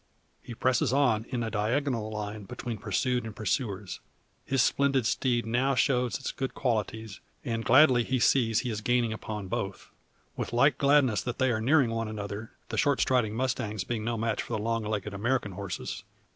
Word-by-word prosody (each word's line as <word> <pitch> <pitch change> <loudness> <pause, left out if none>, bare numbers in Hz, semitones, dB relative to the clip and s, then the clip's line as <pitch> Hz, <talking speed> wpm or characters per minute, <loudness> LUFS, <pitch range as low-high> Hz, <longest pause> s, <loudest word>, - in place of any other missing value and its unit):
He 120 - -9
presses 125 +1 +1
on 125 -6 +2
in 125 -2 -2
a 110 - -3
diagonal 115 +2 0
line 105 -1 -5
between 115 +2 -6
pursued 120 +5 0
and 110 -2 -7
pursuers. 105 -2 -2 0.5
His 135 -2 +3
splendid 140 -3 +2
steed 120 0 +1
now 130 +4 +1
shows 125 -3 +1
its 135 - -4
good 135 -1 -4
qualities, 110 -4 -2 0.3
and 115 -3 -2
gladly 130 -1 +6
he 130 +2 0
sees 115 -2 +3
he 125 - -3
is 105 -1 -4
gaining 120 -1 +1
upon 105 -2 -6
both. 95 +1 -4 0.4
With - - -4
like 130 +3 +3
gladness 140 -5 +4
that 120 0 -4
they 130 -1 +2
are 110 -2 -1
nearing 130 0 +3
one 115 -1 -2
another, 105 +1 -5 0.2
the - - -1
short 145 -3 +2
striding 120 -5 +2
mustangs 110 -5 -1
being 115 -1 -3
no 115 +1 -1
match 115 +1 -1
for - - -6
the 105 -1 -2
long 115 0 0
legged 105 -1 -3
American 115 +1 -1
horses. 95 -1 -5
115 Hz, 185 wpm, -28 LUFS, 110-130 Hz, 0.5 s, gladly